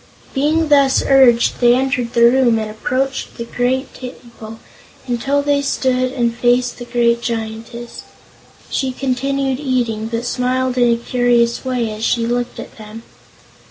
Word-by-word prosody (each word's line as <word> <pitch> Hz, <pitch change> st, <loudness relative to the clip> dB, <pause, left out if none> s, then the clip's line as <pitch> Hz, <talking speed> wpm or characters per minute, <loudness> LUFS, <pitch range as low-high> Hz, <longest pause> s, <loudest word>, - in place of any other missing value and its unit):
Being 305 Hz, +3 st, +1 dB
thus 280 Hz, -2 st, +4 dB
urged, 255 Hz, -4 st, +4 dB
they 240 Hz, 0 st, +5 dB
entered 250 Hz, -2 st, -1 dB
the 235 Hz, -, +3 dB
room 240 Hz, -1 st, +4 dB
and 215 Hz, -1 st, -4 dB
approached 260 Hz, +5 st, -3 dB
the 235 Hz, -, -5 dB
table, 245 Hz, -3 st, -5 dB, 0.5 s
until 270 Hz, +3 st, -1 dB
they 285 Hz, 0 st, +1 dB
stood 255 Hz, -2 st, 0 dB
where 270 Hz, -, -8 dB
they 235 Hz, -, +3 dB
faced 245 Hz, +2 st, 0 dB
the 240 Hz, -, -7 dB
great 235 Hz, -1 st, +1 dB
Giantess. 230 Hz, +1 st, -5 dB, 0.7 s
She 265 Hz, -1 st, -1 dB
continued 270 Hz, +1 st, -1 dB
eating, 240 Hz, -6 st, -1 dB
but 230 Hz, +1 st, -3 dB
smiled 255 Hz, +1 st, -1 dB
in 240 Hz, -1 st, +4 dB
a 235 Hz, -, +2 dB
curious 235 Hz, -1 st, +1 dB
way 250 Hz, -4 st, -2 dB
as 215 Hz, +1 st, -7 dB
she 230 Hz, 0 st, +1 dB
looked 240 Hz, +1 st, -2 dB
at -, -, -10 dB
them. 215 Hz, +1 st, -10 dB
245 Hz, 150 wpm, -18 LUFS, 235-260 Hz, 0.7 s, they